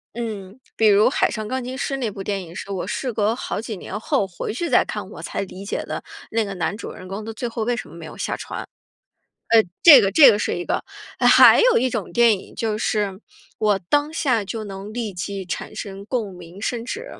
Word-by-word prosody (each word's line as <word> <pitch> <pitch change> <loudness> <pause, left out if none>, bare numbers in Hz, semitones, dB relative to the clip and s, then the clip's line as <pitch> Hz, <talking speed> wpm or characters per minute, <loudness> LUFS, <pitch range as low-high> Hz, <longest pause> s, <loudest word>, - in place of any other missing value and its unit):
嗯， 215 -2 -6 0.2
比 220 - +3
如 205 0 +6
《海 - - +1
上 215 -1 -4
钢 260 +2 -3
琴 255 +2 -5
师》 275 - -2
那 240 -5 -2
部 195 - -8
电 195 -1 -3
影， 165 -1 -12
是 190 - -7
我 190 -2 -3
事 255 -3 -3
隔 215 +1 +1
好 235 - -4
几 220 -2 -6
年 190 - -6
后 260 -2 0
回 190 +3 -5
去 340 +8 -3
再 - - +5
看， - - -6
我 - - -10
才 - - -5
理 195 0 -7
解 200 - -3
的， - - -5 0.3
那 225 0 +1
个 200 -2 -5
男 175 +2 -2
主 215 - -7
人 185 - -11
公 195 +3 -6
到 225 - -6
最 225 +2 -4
后 230 -1 -3
为 240 +1 0
什 - - -6
么 - - -13
没 165 -1 -9
有 155 - -10
下 - - -2
船。 - - -6 0.8
呃， 225 -1 +6 0.2
这 295 -6 +11
个 195 -3 +1
这 295 +4 +8
个 205 - +1
是 - - -1
一 175 - -4
个。 - - -1 0.4
呃， - - +2
还 - - +8
有 - - +5
一 255 +2 +1
种 - - -3
电 235 -4 +4
影 - - -14
就 220 -2 -2
是， 205 -3 -1 0.4
我 210 -2 +2
当 290 +1 +2
下 260 -9 +1
就 220 +2 -5
能 195 0 -8
立 230 -4 -3
即 190 +2 -5
产 185 +4 -6
生 200 -2 -7
共 220 -6 -3
鸣， 175 +2 -12
甚 230 +2 -2
至 465 - -5
215 Hz, 260 characters per minute, -22 LUFS, 195-240 Hz, 0.8 s, 这